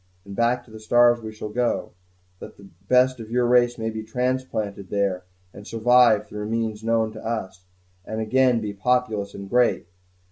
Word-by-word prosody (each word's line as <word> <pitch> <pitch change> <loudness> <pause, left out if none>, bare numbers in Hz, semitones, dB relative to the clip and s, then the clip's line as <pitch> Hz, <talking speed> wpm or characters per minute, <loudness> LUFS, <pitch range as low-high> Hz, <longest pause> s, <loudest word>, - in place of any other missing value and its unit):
and 100 -1 -9
back 120 +2 +1
to 115 - -18
the 110 - -10
stars 120 +2 +4
we 110 -1 -7
shall 110 0 -7
go, 120 +2 -1 0.5
that - - -11
the 100 - -15 0.2
best 130 +1 +3
of 110 -1 -9
your 120 +1 +1
race 120 0 +3
may 110 -1 -3
be 110 0 -5
transplanted 110 -4 -3
there, 100 -3 -1 0.3
and 100 - -12
survive 115 -2 +4
through 105 0 -6
means 110 -1 -2
known 115 -1 +1
to - - -11
us, 95 -5 -5 0.4
and 110 +3 -5
again 125 +2 +2
be 105 -2 -4
populous 110 -1 -1
and 100 0 -8
great. 125 +3 +2
110 Hz, 180 wpm, -23 LUFS, 105-120 Hz, 0.5 s, stars